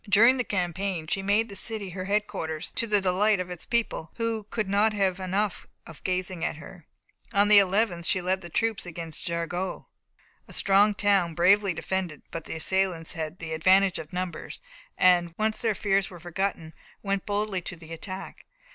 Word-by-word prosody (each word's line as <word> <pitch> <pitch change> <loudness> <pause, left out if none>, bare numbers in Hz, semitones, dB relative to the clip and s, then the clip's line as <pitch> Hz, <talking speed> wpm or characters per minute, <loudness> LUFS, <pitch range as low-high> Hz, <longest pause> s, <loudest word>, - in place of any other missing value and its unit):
During 230 +6 +6
the 250 - +1
campaign 180 -3 -2
she 195 +5 -1
made 205 +3 +2
the 200 - -9
city 205 -2 -2
her 185 +1 -5
headquarters, 185 -6 -2
to 230 - -1
the 210 -2 +3
delight 195 +2 +3
of 180 0 -4
its 175 - -8
people, 235 -8 0
who 225 -3 -2
"could 215 -3 -2
not 205 +3 +3
have 195 -2 0
enough 190 +1 -2 0.2
of 165 - -13
gazing 185 -1 -2
at - - -1
her." 165 +2 -13 0.5
On 205 +1 +4
the 210 -1 +9
11th 190 -3 +1
she 185 - +2
led 185 +1 -1
the 175 - -8
troops 220 +1 -1
against 165 -2 -7
Jargeau, 175 +2 -3 0.6
a - - -13
strong 200 +2 +4
town, 195 -5 +2
bravely 195 +3 +4
defended, 180 -4 -3
but 165 -1 -6
the - - -6
assailants 180 0 0
had 160 +1 -5
the 160 -2 -6
advantage 185 +3 +4
of 155 - -9
numbers, 180 -1 -5 0.4
and, 175 -2 +4
once 215 0 0
their 225 -3 +1
fears 195 -1 +1
were 180 - -11
forgotten, 175 -1 -3 0.3
went 195 -1 -2
boldly 205 -2 -1
to 175 - -6
the 165 -1 -11
attack. 185 +3 -8
190 Hz, 180 wpm, -27 LUFS, 175-205 Hz, 0.6 s, the